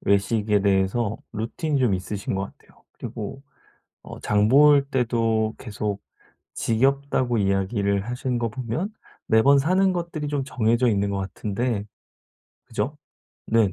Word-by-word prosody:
외식에 105 +1 +2
대해서 100 +3 +1 0.2
루틴이 135 +7 -2
좀 125 -6 +3
있으신 95 +2 -4
것 95 - -1 0.2
같아요. - - -25
그리고 115 +5 -7 0.6
어 - - -9
장 105 0 +2
볼 140 +3 +6
때도 115 -4 +1
계속 105 -3 -4 0.5
지겹다고 130 0 +1
이야기를 100 0 +1
하시는 125 0 -2
거 115 -1 0
보면 130 - -4 0.3
매번 135 +6 +5
사는 185 +6 +3
것들이 170 -4 -3
좀 145 -2 -1
정해져 120 -1 +1
있는 100 -2 +1
것 100 - -2
같은데. 100 +3 -2 0.8
그죠? - - -3 0.5
네 110 -4 +3
115 Hz, 265 characters per minute, -24 LUFS, 100-135 Hz, 0.8 s, 볼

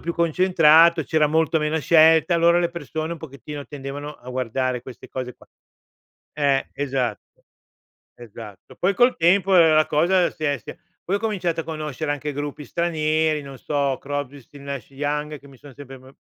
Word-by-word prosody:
più 170 - -3
concentrato, 170 -1 +4
c'era 155 0 +2
molto 160 +1 +1
meno 150 +1 -1
scelta, 160 +2 +5
allora 170 +1 +4
le 175 -1 0
persone, 160 -1 -5
un 170 - -7
pochettino, 145 -1 -9
tendevano 145 +1 -7
a 125 - -15
guardare 130 0 -2
queste 125 -2 -12
cose 125 -1 -5
qua. - - -21 0.9
Eh, 140 -2 0
esatt 130 -6 -2 1.0
esatto. 110 -3 -12
Poi 190 +3 +2
col 245 +6 +3
tempo, 185 +3 +3
ehm, 165 -2 +6
la 155 -1 +4
cosa 175 +4 +2
si 155 - -8
è 145 -1 +1
si 110 - -10
è - - -13 0.3
poi 195 - 0
ho - - -2
cominciato 190 -6 -2
a - - -7
conoscere 155 -2 -5
anche 145 +1 -4
gruppi 145 +1 -6
stranieri, 155 -1 0
non 135 -1 -11
so, 140 -2 -1
Crosby, 145 -1 -5
Stills, 140 +3 -15
Nash& 140 -5 -6
Young, 150 +2 -3
che 140 - -18
mi 135 - -17
son 140 0 -14
sempre 135 -1 -11
m 130 +1 -17
150 Hz, 180 wpm, -22 LUFS, 140-165 Hz, 1.0 s, ehm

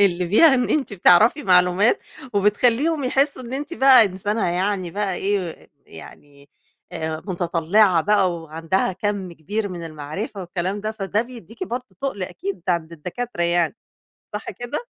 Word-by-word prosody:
اللي 180 -3 +2
فيها 270 - +6
إن 250 -1 0
أنتِ 280 -8 0
بتعرفي 210 - +5
معلومات 180 +3 +4 0.4
وبتخليهم 245 +9 +2
يحسوا 270 +1 +1
إن 240 +1 -9
أنتِ 295 +5 -4
بقى 265 -5 +7
إنسانة 200 +2 -2
يعني 185 0 -1
بقى 200 0 -2
إيه 195 -4 -3 0.2
يعني، 140 -1 -14 0.4
آآ 160 0 -4
متطلعة 175 +1 +2
بقى 195 0 +2
وعندها 165 +4 -2
كم 195 -1 -3
كبير 205 +7 -3
من 175 -2 -7
المعرفة 160 +7 -6
والكلام 185 +3 -3
ده 215 +1 -3
فده 210 +1 -1
بيديكِ 240 - -9
برضه 250 -4 -4 0.2
تُقل 265 -9 -3
أكيد 185 0 -5
عند 170 -2 0
الدكاترة 180 +5 -5
يعني 170 +2 +1 0.6
صح 210 - -5
كده؟ 245 - -6
195 Hz, 145 wpm, -22 LUFS, 175-230 Hz, 0.6 s, بقى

